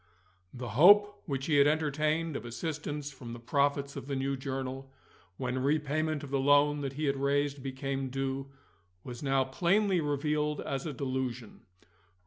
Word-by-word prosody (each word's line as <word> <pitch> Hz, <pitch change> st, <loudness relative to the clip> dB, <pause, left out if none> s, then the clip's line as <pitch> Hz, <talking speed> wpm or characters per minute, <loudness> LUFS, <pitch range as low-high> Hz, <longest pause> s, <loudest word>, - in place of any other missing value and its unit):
The 125 Hz, -1 st, -6 dB
hope 205 Hz, -, +6 dB
which 135 Hz, -3 st, -2 dB
he 150 Hz, -3 st, +2 dB
had 140 Hz, 0 st, +6 dB
entertained 155 Hz, +1 st, 0 dB
of -, -, -4 dB
assistance 145 Hz, +3 st, -4 dB
from 125 Hz, -4 st, -9 dB
the 120 Hz, -, -8 dB
profits 140 Hz, +3 st, 0 dB
of -, -, -7 dB
the 140 Hz, -, -2 dB
new 135 Hz, +1 st, -1 dB
journal, 135 Hz, 0 st, -5 dB, 0.5 s
when 130 Hz, 0 st, -2 dB
repayment 150 Hz, +2 st, 0 dB
of 140 Hz, -, -8 dB
the 140 Hz, -, +1 dB
loan 145 Hz, +2 st, +4 dB
that 135 Hz, -1 st, -3 dB
he 150 Hz, +3 st, -2 dB
had 140 Hz, -1 st, +1 dB
raised 140 Hz, 0 st, 0 dB
became 135 Hz, 0 st, -3 dB
due, 135 Hz, +1 st, -3 dB, 0.6 s
was 125 Hz, -1 st, -8 dB
now 135 Hz, -2 st, +2 dB
plainly 180 Hz, +7 st, +2 dB
revealed 150 Hz, +1 st, 0 dB
as 135 Hz, +3 st, -3 dB
a 150 Hz, -, -4 dB
delusion. 130 Hz, -5 st, -4 dB
140 Hz, 160 wpm, -30 LUFS, 135-150 Hz, 0.6 s, hope